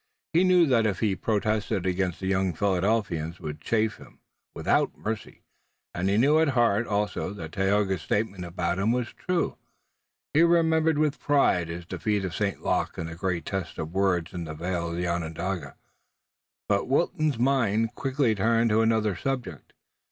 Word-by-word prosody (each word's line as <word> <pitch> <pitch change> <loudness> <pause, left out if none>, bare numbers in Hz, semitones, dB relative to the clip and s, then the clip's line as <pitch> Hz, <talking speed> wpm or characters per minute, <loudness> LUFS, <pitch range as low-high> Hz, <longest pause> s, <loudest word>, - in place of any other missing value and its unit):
He 170 +3 +5
knew 180 -2 +5
that 120 -6 +3
if 100 - -2
he 105 -4 +1
protested 105 -1 -1
again 90 -1 0
the 95 - -5
young 95 -1 +1
Philadelphians 95 -4 0
would 75 0 -6
chaff 110 +1 0
him - - -16 0.4
without - - +1
mercy, 110 0 -5 0.5
and 95 +2 -1
he 100 - +2
knew 145 +7 +4
at 160 - +3
heart 115 -1 +3
also 105 -1 -1
that 80 -6 -8
Tayoga's 95 -1 +1
statement 100 +1 -1
about 85 +1 -2
him 105 +4 +2
was 120 -1 -1
true. 180 -2 -2 0.7
He 155 - +5
remembered 160 -2 +3
with 150 -1 +1
pride 135 - +2
his 85 +1 -6
defeat 105 +2 -1
of 90 - -4
St. 100 -2 -2
Luc - - 0
in 85 - -3
the 80 0 -7
great 85 -1 -2
test 95 -3 -4
of 80 +2 -5
words 95 -3 +1
in 85 -2 -4
the 80 -1 -6
vale 85 +1 -2
of 85 0 -4
Onondaga. 85 +2 -3 0.9
But 100 -1 +1
Wilton's 155 0 +1
mind 115 -3 +1
quickly 135 -2 0
turned 115 +2 +2
to 110 +1 +4
another 110 -3 +2
subject. 125 - -4
100 Hz, 165 wpm, -26 LUFS, 90-120 Hz, 0.9 s, He